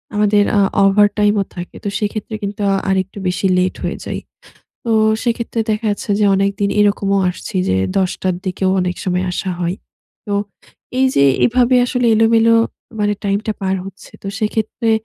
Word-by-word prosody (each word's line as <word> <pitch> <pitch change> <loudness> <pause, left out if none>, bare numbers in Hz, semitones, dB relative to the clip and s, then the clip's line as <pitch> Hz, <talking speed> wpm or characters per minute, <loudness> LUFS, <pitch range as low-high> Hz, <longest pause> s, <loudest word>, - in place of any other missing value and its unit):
আমাদের 210 0 +3
আ - - +5 0.3
ওভারটাইম 205 +1 +3
ও - - +1
থাকে। 175 -1 -7
তো 205 - -2
সেক্ষেত্রে 215 +1 -3
কিন্তু 200 +1 -4 0.3
আরেকটু 190 +1 -1
বেশি 180 +2 -1
লেট 180 0 +1
হয়ে - - -2
যায়। - - -4 0.6
তো 230 - 0 0.3
সেক্ষেত্রে 235 -1 -1
দেখা 215 +1 -1
যাচ্ছে 205 +1 -4
যে - - +4
অনেকদিন 200 +1 0
এরকমও 200 -1 +2
আসছি 185 - -7
যে 95 - +2 0.2
১০ 185 -2 +1
টার 185 -1 +1
দিকেও 185 +1 0
অনেক 180 -1 -2
সময় 180 0 0
আসা 185 +1 -3
হয়। 175 +1 -1 0.5
তো 205 - -2 0.6
এই 265 - +4
যে 140 - +4 0.2
এভাবে 245 +1 +3
আসলে 250 -1 0
এলোমেলো 225 +1 +4 0.5
মানে 205 0 +1
টাইম 200 0 +1
টা 215 - 0
পার 190 0 0
হচ্ছে। 195 -1 -12
তো 195 - -5
সেক্ষেত্রে 220 +1 -1
205 Hz, 170 wpm, -17 LUFS, 190-220 Hz, 0.6 s, আ